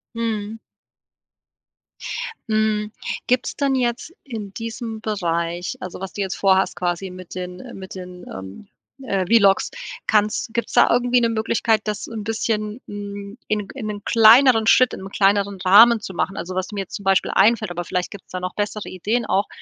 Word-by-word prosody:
Mhm. 220 Hz, -2 st, -3 dB, 1.9 s
Mhm. 215 Hz, -1 st, +1 dB, 0.4 s
Gibt's 250 Hz, 0 st, +1 dB
dann 275 Hz, -2 st, +1 dB
jetzt 250 Hz, +5 st, -1 dB
in 215 Hz, -7 st, -7 dB
diesem 225 Hz, 0 st, -6 dB
Bereich, 175 Hz, -4 st, -2 dB
also 185 Hz, 0 st, -7 dB
was 195 Hz, -1 st, -6 dB
du 205 Hz, -, -4 dB
jetzt 190 Hz, -1 st, -2 dB
vor 190 Hz, -1 st, +4 dB
hast 190 Hz, -, 0 dB
quasi 180 Hz, +1 st, -2 dB
mit 185 Hz, -1 st, -10 dB
den, 180 Hz, 0 st, -6 dB
äh 245 Hz, +3 st, -10 dB
mit 190 Hz, 0 st, -9 dB
den, 180 Hz, -1 st, -9 dB
ähm, 95 Hz, -, -9 dB, 0.4 s
äh, 195 Hz, -7 st, -1 dB
V-Logs, 200 Hz, -1 st, +4 dB, 0.4 s
kannst 215 Hz, +1 st, +1 dB
gibt's 235 Hz, -, -2 dB
da -, -, +6 dB
irgendwie 245 Hz, +1 st, +3 dB
'ne 235 Hz, -, +3 dB
Möglichkeit, 225 Hz, 0 st, +1 dB
das 210 Hz, -1 st, -3 dB
'n 220 Hz, -3 st, -6 dB
bisschen, 215 Hz, 0 st, -2 dB
hm, 205 Hz, +1 st, -7 dB
in 210 Hz, -2 st, -1 dB
in 250 Hz, -5 st, -5 dB
'nen 205 Hz, -1 st, -5 dB
kleineren 225 Hz, 0 st, +6 dB
Schritt, 255 Hz, +1 st, +5 dB
im 190 Hz, +1 st, -7 dB
kleineren 200 Hz, 0 st, +2 dB
Rahmen 225 Hz, +5 st, +8 dB
zu 195 Hz, -2 st, -7 dB
machen? 190 Hz, +3 st, -2 dB
Also 185 Hz, +1 st, -5 dB
was 185 Hz, 0 st, -1 dB
da 210 Hz, -, -9 dB
mir 200 Hz, -, -1 dB
jetzt 190 Hz, -, -7 dB
zum 200 Hz, -, -7 dB
Beispiel 195 Hz, -1 st, +2 dB
einfällt- 215 Hz, -1 st, +3 dB
aber 175 Hz, 0 st, -3 dB
vielleicht 180 Hz, +1 st, -2 dB
gibt's 200 Hz, -, -12 dB
da 185 Hz, -, -3 dB
noch 180 Hz, 0 st, -4 dB
bessere 210 Hz, 0 st, -3 dB
Ideen 215 Hz, +6 st, -1 dB
auch- 200 Hz, -1 st, +1 dB
205 Hz, 180 wpm, -22 LUFS, 190-225 Hz, 1.9 s, Rahmen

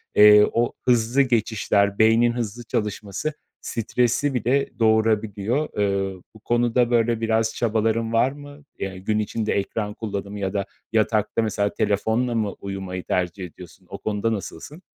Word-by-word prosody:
eee, 105 Hz, 0 st, +8 dB
o 120 Hz, +1 st, 0 dB
hızlı 120 Hz, +2 st, +3 dB
geçişler, 110 Hz, -5 st, +1 dB
beynin 115 Hz, +2 st, +5 dB
hızlı 120 Hz, 0 st, -4 dB
çalışması 105 Hz, +5 st, -3 dB, 0.3 s
stresi 120 Hz, +4 st, 0 dB
bile 130 Hz, +3 st, +1 dB
doğurabiliyor. 110 Hz, +3 st, +1 dB
Eee, 100 Hz, -2 st, -1 dB
bu 110 Hz, -, -15 dB
konuda, 120 Hz, +1 st, +1 dB
böyle, 115 Hz, -1 st, +2 dB
biraz 110 Hz, 0 st, +1 dB
çabaların 115 Hz, 0 st, 0 dB
var 125 Hz, +3 st, +3 dB
mı? 145 Hz, 0 st, -12 dB, 0.2 s
Ya, 95 Hz, -1 st, -4 dB
gün 105 Hz, +3 st, -1 dB
içinde 110 Hz, +1 st, -1 dB
ekran 105 Hz, +1 st, -2 dB
kullanımı 100 Hz, -2 st, -5 dB
ya 95 Hz, -1 st, -2 dB
da 100 Hz, -1 st, -1 dB, 0.3 s
yatakta, 110 Hz, 0 st, +1 dB
mesela, 105 Hz, -2 st, -1 dB
telefonla 110 Hz, +3 st, 0 dB
mı 105 Hz, -3 st, 0 dB
uyumayı 95 Hz, -2 st, -5 dB
tercih 90 Hz, +1 st, -2 dB
ediyorsun? 90 Hz, +1 st, -14 dB
O -, -, -6 dB
konuda 110 Hz, +2 st, -1 dB
nasılsın? 110 Hz, -, -7 dB
110 Hz, 140 wpm, -23 LUFS, 100-120 Hz, 0.3 s, eee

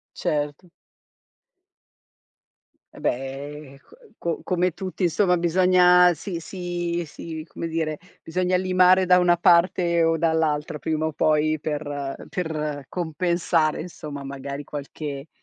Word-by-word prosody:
Certo. 150 Hz, +4 st, -2 dB, 2.2 s
Eh -, -, -13 dB
beh, 135 Hz, +2 st, -4 dB
ehm, -, -, -15 dB
co 140 Hz, -, -21 dB, 0.2 s
co 170 Hz, -1 st, -2 dB
come 180 Hz, 0 st, 0 dB
tutti 185 Hz, +1 st, -4 dB
insomma 180 Hz, +2 st, +3 dB
bisogna 180 Hz, +1 st, +5 dB
si 170 Hz, +2 st, -5 dB
si 175 Hz, -1 st, -3 dB
si, 160 Hz, +1 st, -8 dB
come 165 Hz, -, -6 dB
dire, 160 Hz, -2 st, -2 dB, 0.2 s
bisogna 180 Hz, +2 st, 0 dB
limare 185 Hz, 0 st, +4 dB
da 180 Hz, 0 st, +6 dB
una 175 Hz, -1 st, +4 dB
parte 170 Hz, -1 st, +3 dB
o 165 Hz, 0 st, +2 dB
dall'altra 160 Hz, -2 st, 0 dB
prima 155 Hz, 0 st, -1 dB
o 160 Hz, -, -2 dB
poi, 155 Hz, +1 st, +2 dB
per 145 Hz, -2 st, -4 dB
per 150 Hz, -5 st, -3 dB
compensare 170 Hz, -2 st, 0 dB
insomma, 150 Hz, -4 st, -7 dB
magari 140 Hz, +1 st, -6 dB
qualche 145 Hz, 0 st, -6 dB
165 Hz, 120 wpm, -24 LUFS, 150-180 Hz, 2.2 s, da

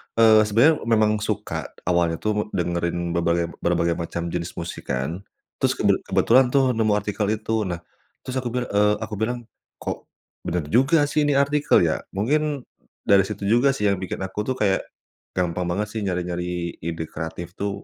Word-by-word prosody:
eee, 110 Hz, -1 st, +7 dB
sebenernya 130 Hz, +9 st, +4 dB
memang 110 Hz, -2 st, +3 dB
suka -, -, -3 dB, 0.2 s
awalnya 85 Hz, -2 st, +2 dB
tuh 105 Hz, +4 st, -1 dB
dengerin 85 Hz, 0 st, -1 dB
berbagai 85 Hz, 0 st, 0 dB
berbagai 85 Hz, -1 st, +1 dB
macam 85 Hz, 0 st, -4 dB
jenis 85 Hz, 0 st, -4 dB
musik 85 Hz, 0 st, -6 dB
kan, 65 Hz, +8 st, -2 dB, 0.4 s
terus -, -, +2 dB
kebe -, -, +2 dB
kebetulan 130 Hz, +2 st, +4 dB
tuh 130 Hz, 0 st, +3 dB
nemu 110 Hz, -3 st, +2 dB
artikel 105 Hz, 0 st, -1 dB
itu. 110 Hz, -1 st, -1 dB
Nah, 85 Hz, -1 st, -4 dB, 0.4 s
terus 130 Hz, 0 st, -3 dB
aku 125 Hz, -, -4 dB
bil 125 Hz, +1 st, -1 dB
eee, 105 Hz, +1 st, +3 dB
aku 105 Hz, -, -5 dB
bilang, 120 Hz, +2 st, -2 dB, 0.4 s
"Kok -, -, -5 dB, 0.4 s
bener 85 Hz, -1 st, -1 dB
juga 135 Hz, +6 st, +4 dB
sih 150 Hz, -1 st, +2 dB
ini 145 Hz, -, +2 dB
artikel, 140 Hz, +1 st, +3 dB
ya." -, -, +1 dB, 0.2 s
Mungkin 145 Hz, +6 st, 0 dB, 0.4 s
dari 100 Hz, -1 st, +5 dB
situ 105 Hz, -1 st, -6 dB
juga 120 Hz, +7 st, +3 dB
sih 135 Hz, -, -4 dB
yang 100 Hz, -, -1 dB
bikin 95 Hz, 0 st, -4 dB
aku 105 Hz, +3 st, -4 dB
tuh 130 Hz, -, 0 dB
kayak 100 Hz, -5 st, +1 dB, 0.5 s
gampang 90 Hz, 0 st, -1 dB
banget 100 Hz, +4 st, -1 dB
sih 110 Hz, -, -3 dB
nyari-nyari 90 Hz, -1 st, -3 dB
ide 80 Hz, 0 st, -4 dB
kreatif 80 Hz, +2 st, -6 dB
tuh, 100 Hz, 0 st, -3 dB
100 Hz, 170 wpm, -23 LUFS, 85-115 Hz, 0.5 s, eee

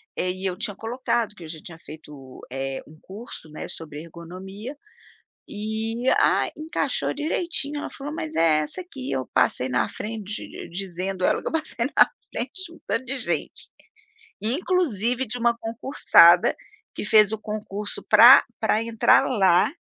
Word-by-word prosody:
é, 180 Hz, -, -1 dB
e 185 Hz, +1 st, -7 dB
eu 185 Hz, -1 st, -1 dB
tinha 205 Hz, +1 st, -3 dB
colocado 230 Hz, 0 st, -2 dB
que 175 Hz, -, -12 dB
eu -, -, -8 dB
já 155 Hz, 0 st, -7 dB
tinha 165 Hz, -, -10 dB
feito, 150 Hz, -5 st, -12 dB
eh, 135 Hz, +1 st, -4 dB
um 155 Hz, -, -15 dB
curso, 195 Hz, -5 st, -10 dB
né, 155 Hz, -, -7 dB
sobre 150 Hz, -2 st, -7 dB
ergonomia, 190 Hz, -, -9 dB, 0.7 s
e, 220 Hz, +3 st, -3 dB
ah, -, -, +3 dB
encaixou 310 Hz, +2 st, -1 dB
direitinho. 300 Hz, -1 st, -1 dB
Ela -, -, -5 dB
falou: 285 Hz, +2 st, -7 dB
"Mas 315 Hz, -1 st, -5 dB
é 160 Hz, -2 st, +4 dB
essa 150 Hz, -, -4 dB
aqui." 275 Hz, -7 st, -8 dB
Eu 130 Hz, -, -2 dB
passei 130 Hz, -, +2 dB
na 125 Hz, -3 st, +1 dB
frente 215 Hz, -1 st, -6 dB
di -, -, -9 dB
dizendo 185 Hz, +1 st, -4 dB
ela -, -, +2 dB
que -, -, -2 dB
eu -, -, -8 dB
passei 315 Hz, -7 st, -1 dB
na -, -, +5 dB, 0.3 s
frente 375 Hz, -, -5 dB
de 335 Hz, -, -11 dB
um 335 Hz, -, -16 dB
tanto 260 Hz, -, -1 dB
de 265 Hz, +2 st, -4 dB
gente, -, -, -3 dB, 0.7 s
e 220 Hz, +5 st, 0 dB
inclusive 265 Hz, -, 0 dB
uma 235 Hz, 0 st, +2 dB
concursada 230 Hz, +5 st, +5 dB, 0.4 s
que -, -, -5 dB
fez 215 Hz, -1 st, +5 dB
o 220 Hz, -, -2 dB
concurso 210 Hz, -1 st, -5 dB
para -, -, +9 dB, 0.2 s
para 215 Hz, -, +1 dB
entrar 230 Hz, -1 st, +4 dB
lá 190 Hz, -7 st, +3 dB
215 Hz, 165 wpm, -24 LUFS, 175-255 Hz, 0.7 s, para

